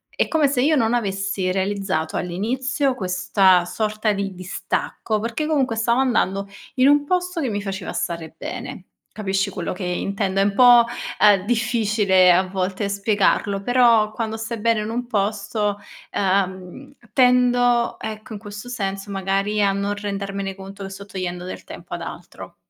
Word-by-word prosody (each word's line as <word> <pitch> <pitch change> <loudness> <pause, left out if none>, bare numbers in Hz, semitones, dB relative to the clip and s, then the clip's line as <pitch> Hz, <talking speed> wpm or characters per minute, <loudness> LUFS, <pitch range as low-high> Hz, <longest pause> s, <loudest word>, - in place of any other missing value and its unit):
è - - +1
come 310 -3 +3
se 270 -2 0
io 310 +3 +3
non 230 -4 +2
avessi 195 -4 -1
realizzato 190 -4 -1
all'inizio 255 - -1
questa 185 -2 +3
sorta 215 +2 -1
di 195 -2 -3
distacco, 185 +3 -3
perché 230 +8 -2
comunque 270 -7 +1
stavo 235 +3 +1
andando 200 -6 +1 0.3
in 260 0 +4
un 290 0 +5
posto 360 +1 -1
che 265 - -1
mi 205 -1 -3
faceva 195 -2 -5
stare 170 -3 -3
bene. 185 - -7 0.2
Capisci 195 -1 -1
quello 185 -2 -4
che 180 - -7
intendo? 195 +2 -1
È - - +4
un 200 0 +1
po', 245 0 +7 0.3
ehm, 205 -2 +5
difficile 215 -5 +3
a 185 +2 +4
volte 190 +1 -2
spiegarlo, 200 -1 +1
però 235 -3 +4
quando 220 0 -3
stai 225 0 -5
bene 225 -1 +2
in 215 - -4
un 240 +1 -3
posto, 205 -1 -1 0.3
ehm, 190 +7 -1 0.2
tendo 245 -1 +3
ecco, 220 +2 -7
in 205 - -6
questo 205 +2 -9
senso 195 -4 -4
magari, 195 +2 0
a 200 - +3
non 200 +1 -2
rendermene 200 -1 -4
conto 195 +1 -10
che 195 - -6
sto 200 +1 -10
togliendo 180 -2 -4
del 185 - -7
tempo - - -10
ad - - -7
altro. - - -9
205 Hz, 160 wpm, -22 LUFS, 195-235 Hz, 0.3 s, po